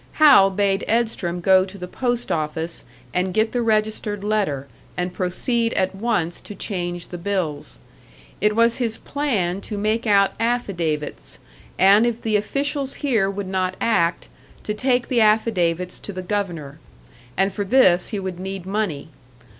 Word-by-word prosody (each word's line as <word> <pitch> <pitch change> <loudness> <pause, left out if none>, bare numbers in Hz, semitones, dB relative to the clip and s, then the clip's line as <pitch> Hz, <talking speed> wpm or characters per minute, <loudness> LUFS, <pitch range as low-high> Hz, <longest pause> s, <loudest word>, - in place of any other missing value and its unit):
Hal 280 -11 +7
bade 195 0 0
Edstrom 215 -6 0
go 190 +1 +5
to 190 +1 -9
the 180 -1 -6
post 245 +4 -2
office 160 +1 -3 0.3
and 180 0 -1
get 220 +1 +2
the 245 - 0
registered 215 -2 0
letter, 200 -11 0 0.3
and 180 0 -2
proceed 230 +6 0
at 190 0 0
once 195 -5 -1
to 205 - -9
change 175 -3 -4
the 175 - -7
bills. 170 -6 -3 0.6
It 210 +1 +2
was 230 +1 +3
his 230 -3 -1
plan 205 -11 -1
to 210 - -6
make 215 +3 0
out 200 -1 +4
affidavits, 175 -11 -2 0.4
and 200 +5 +6
if 235 -1 -2
the 220 -2 -1
officials 275 +5 -1
here 220 -8 +2
would 200 0 -4
not 185 -1 -1
act, 170 -7 +1 0.4
to 210 - -2
take 250 +2 +1
the 245 -3 +2
affidavits 180 -5 +2
to - - -7
the 185 -1 -6
Governor. 175 -7 -3 0.6
And 195 0 +2
for 205 - -2
this 190 -5 +4
he 215 - -3
would 190 -2 -5
need 190 -1 -5
money. 190 -8 -2
200 Hz, 155 wpm, -22 LUFS, 180-225 Hz, 0.6 s, Hal